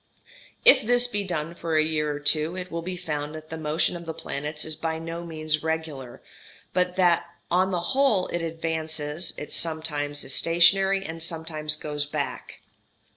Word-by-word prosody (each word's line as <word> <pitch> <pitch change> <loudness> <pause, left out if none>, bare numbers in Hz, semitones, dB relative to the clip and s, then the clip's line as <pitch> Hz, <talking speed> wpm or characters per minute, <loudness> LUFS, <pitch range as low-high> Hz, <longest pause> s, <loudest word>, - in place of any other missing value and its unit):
If - - +9
this 245 +2 +5
be 205 -4 -1
done 170 -3 -3
for 165 -1 -3
a 155 - +5
year 155 -1 0
or 145 - -4
two, 155 +4 +2
it 185 0 -6
will 170 - -3
be 180 +2 -4
found 150 -3 -4
that 155 0 -10
the 160 - -4
motion 155 +3 +1
of 170 -1 -8
the 160 - -4
planet 150 +1 -4
is 155 -1 -1
by 160 0 -2
no 165 +1 -5
means 155 -2 -1
regular, 160 -6 -4 0.5
but 180 0 +1
that 175 -3 +3 0.2
though - - +3
on 185 +1 +3
the 180 -2 0
whole 260 -9 +3
it 175 - -2
advances 160 -1 -2
it 150 - -7
sometimes 150 -3 0
is 135 - -4
stationary 195 +5 +4
and 165 0 -6
sometimes 160 -2 -2
goes 150 -1 -3
back. - - -4
160 Hz, 180 wpm, -26 LUFS, 155-175 Hz, 0.5 s, If